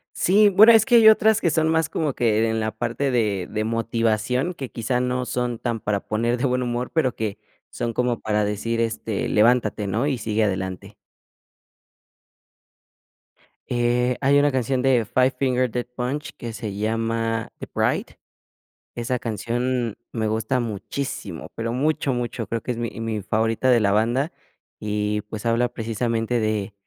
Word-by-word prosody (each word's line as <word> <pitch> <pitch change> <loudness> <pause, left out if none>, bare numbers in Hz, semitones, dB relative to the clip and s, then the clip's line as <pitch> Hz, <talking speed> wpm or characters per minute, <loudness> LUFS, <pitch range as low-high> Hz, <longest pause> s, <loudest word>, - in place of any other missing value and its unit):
Sí. 205 +3 +4
Bueno, 215 +4 +8
es 220 -2 +6
que 245 -3 +4
hay 220 -1 +8
otras 220 0 +5
que 170 - +2
son 160 0 +2
más 160 -1 +1
como 150 -4 -1
que 115 -2 +2
en 110 0 -1
la 110 0 -1
parte 120 +5 -2
de 105 -7 0
de 110 0 -2
motivación, 115 - 0
que, 135 -7 -7
quizá, 125 +2 -1
no 125 0 -1
son 125 -2 -2
tan 115 -2 -3
para 105 -1 -1
poner 115 +4 -1
de 125 - -3
buen 125 -1 +1
humor, 120 0 -2
pero 135 -7 +1
que 105 -2 -3 0.3
son 120 -2 -3
como 125 -1 0
para 105 -1 0
decir, 105 +3 -2
este, 110 -2 -2
levántate, 110 -2 +2
¿no? 110 +7 0
Y 140 -4 0
sigue 110 0 0
adelante. 95 -2 -3 2.7
Eh, 125 +1 +1
hay 140 +1 +4
una 145 0 +4
canción 130 -1 0
de 130 -3 +3
Five 130 +5 +2
Finger 130 -2 +1
Death 125 +1 -3
Punch, 130 +5 -3
que 115 -1 -6
se 110 -2 -5
llama 115 +1 -1
The - - -8
Bright. - - 0 0.9
Esa 120 +1 -2
canción 120 +1 -2 0.2
me 110 -2 -1
gusta 110 +4 0
muchísimo, 120 +4 -5
pero 115 +1 -3
mucho, 145 +1 0
mucho. 120 -3 -3
Creo 115 0 -2
que 125 - -3
es 120 - -4
mi 120 -1 -2
mi 110 -2 -2
favorita 110 +4 0
de 120 -2 +5
la 100 -1 +2
banda. 120 - +1 0.5
Y, 105 0 -1
pues, 110 +1 -6
habla 115 +1 +2
precisamente 115 0 -1
de 110 -2 -1
120 Hz, 165 wpm, -23 LUFS, 110-125 Hz, 2.7 s, Bueno